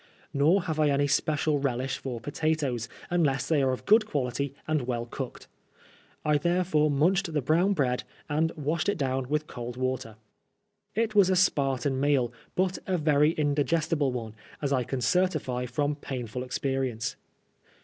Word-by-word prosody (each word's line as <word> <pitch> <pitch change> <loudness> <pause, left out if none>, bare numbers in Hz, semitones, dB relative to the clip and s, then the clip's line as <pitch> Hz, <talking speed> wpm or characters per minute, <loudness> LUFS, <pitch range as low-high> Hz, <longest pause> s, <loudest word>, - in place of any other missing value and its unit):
Nor 160 +7 +3
have 160 -2 -3
I 150 -1 +4
any 140 0 +2
special 145 +1 +1
relish 130 -1 -1
for 125 -3 -5
potatoes, 140 -3 -1 0.2
unless 150 -6 +1
they 155 -3 +3
are 135 -1 +2
of 130 - -4
good 215 +1 +5
quality 140 - -2
and 155 -5 0
well 120 -2 -1
cooked. 120 - -7 0.8
I 150 -1 +3
therefore 170 -2 +2
munched 170 +6 +2
the 155 - +1
brown 165 +8 +2
bread, 125 -7 0 0.2
and 155 +2 +1
washed 155 +4 -1
it 205 - 0
down 130 -3 -1
with 150 +1 0
cold 120 -3 -7
water. 130 -3 -2 0.8
It 225 -1 +1
was 200 -3 +5
a 185 - +3
Spartan 135 -6 +2
meal, 135 -4 +2 0.2
but 185 0 +1
a 185 -1 +1
very 150 -1 +4
indi 145 -2 +1
gestible 155 -1 +1
one, 115 -3 -5 0.3
as 140 -2 -2
1 130 -3 +1
can 130 +1 -3
certify 130 -4 +1
from 145 +4 0
painful 125 -4 -5
experience. 130 -3 -2
145 Hz, 160 wpm, -28 LUFS, 130-160 Hz, 0.8 s, good